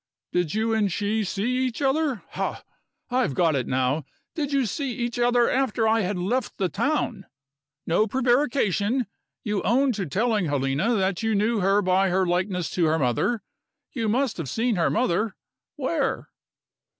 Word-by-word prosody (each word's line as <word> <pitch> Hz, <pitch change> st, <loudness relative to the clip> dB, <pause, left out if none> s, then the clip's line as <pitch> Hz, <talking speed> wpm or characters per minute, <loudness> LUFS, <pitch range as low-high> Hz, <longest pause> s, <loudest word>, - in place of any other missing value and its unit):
"Did 175 Hz, -2 st, 0 dB
you 225 Hz, +1 st, +1 dB
and 210 Hz, -3 st, +1 dB
she 210 Hz, +4 st, 0 dB
see 220 Hz, +6 st, -1 dB
each 235 Hz, -, -5 dB
other 275 Hz, -3 st, 0 dB
ha! -, -, -4 dB, 0.5 s
I've 250 Hz, -, +1 dB
got 165 Hz, -2 st, +3 dB
it 130 Hz, -3 st, -1 dB
now 130 Hz, +4 st, 0 dB, 0.3 s
did 295 Hz, -4 st, -2 dB
you 275 Hz, -2 st, +2 dB
see 270 Hz, +4 st, -2 dB
each 240 Hz, +1 st, -3 dB
other 240 Hz, 0 st, +3 dB
after 245 Hz, -4 st, +1 dB
I 225 Hz, +1 st, +3 dB
had 195 Hz, 0 st, -1 dB
left 220 Hz, +7 st, -1 dB
the 190 Hz, -2 st, 0 dB
town? 230 Hz, -, -1 dB, 0.6 s
No 190 Hz, +7 st, +2 dB
prevarication! 245 Hz, -, +1 dB, 0.4 s
You 210 Hz, -2 st, -1 dB
own 265 Hz, +4 st, +2 dB
to 200 Hz, -6 st, -3 dB
telling 215 Hz, -, +1 dB
Helena 145 Hz, -, 0 dB
that 190 Hz, -2 st, 0 dB
you 225 Hz, -1 st, +1 dB
knew 215 Hz, +2 st, +1 dB
her 195 Hz, +2 st, +3 dB
by 185 Hz, +1 st, +3 dB
her 190 Hz, +1 st, +2 dB
likeness 180 Hz, 0 st, -1 dB
to 175 Hz, -, +1 dB
her 160 Hz, +1 st, +2 dB
mother. 145 Hz, -, 0 dB, 0.5 s
You 230 Hz, -5 st, -2 dB
must 255 Hz, +2 st, 0 dB
have 160 Hz, -7 st, -4 dB
seen 230 Hz, -, 0 dB
her 170 Hz, -, +2 dB
mother. 215 Hz, -2 st, 0 dB, 0.4 s
Where?" 275 Hz, -2 st, -1 dB
215 Hz, 165 wpm, -25 LUFS, 180-245 Hz, 0.6 s, got